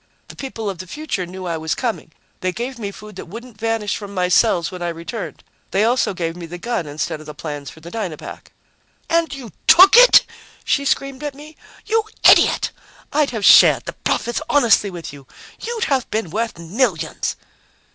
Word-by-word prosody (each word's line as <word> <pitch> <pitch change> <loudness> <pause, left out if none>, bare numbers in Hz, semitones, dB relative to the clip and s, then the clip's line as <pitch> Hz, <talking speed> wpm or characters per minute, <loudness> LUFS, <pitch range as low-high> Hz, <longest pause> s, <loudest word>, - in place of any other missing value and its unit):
"The - - -11
people 230 -5 -6
of 190 -4 -4
the 185 - -8
future 245 - -4
knew 185 +1 -8
I 170 -2 -2
was 160 0 -2
coming. 230 -9 -3 0.3
They 185 - -1
gave 240 +5 -5
me 205 -3 -4
food 210 0 -12
that - - -8
wouldn't 230 +3 -11
vanish 225 -2 -1
from 200 -1 -8
my 180 -1 0
cells 180 -4 +3
when 180 -1 -8
I 175 - -1
returned. 170 +7 -7 0.3
They 195 +2 +1
also 235 -3 +1
gave 165 -1 -3
me 175 -1 -8
the 175 +2 -7
gun 205 -4 -3
instead 150 +1 -4
of 155 - -13
the 150 - -8
plans 145 -3 -6
for 160 - -15
the 170 +2 -10
Dynapack." 190 -9 -6 0.6
"And 335 0 +2
you 260 -6 -8 0.2
took 375 +5 +8
it?" - - +8 0.4
she 280 - 0
screamed 275 0 -1
at 290 -2 -5
me. 300 +2 -13 0.3
"You 445 0 +1 0.2
idiot! - - +5 0.4
I'd 295 -1 +2
have 220 -5 -3
shared - - +7
the - - -5
profits 240 +4 -2
honestly 235 -7 +4
with 170 -5 -8
you. 140 -2 -14 0.3
You'd 465 0 -3
have 270 - 0
been 215 -7 -3
worth 225 -1 -2
millions!" 170 - -1
210 Hz, 195 wpm, -20 LUFS, 175-260 Hz, 0.6 s, took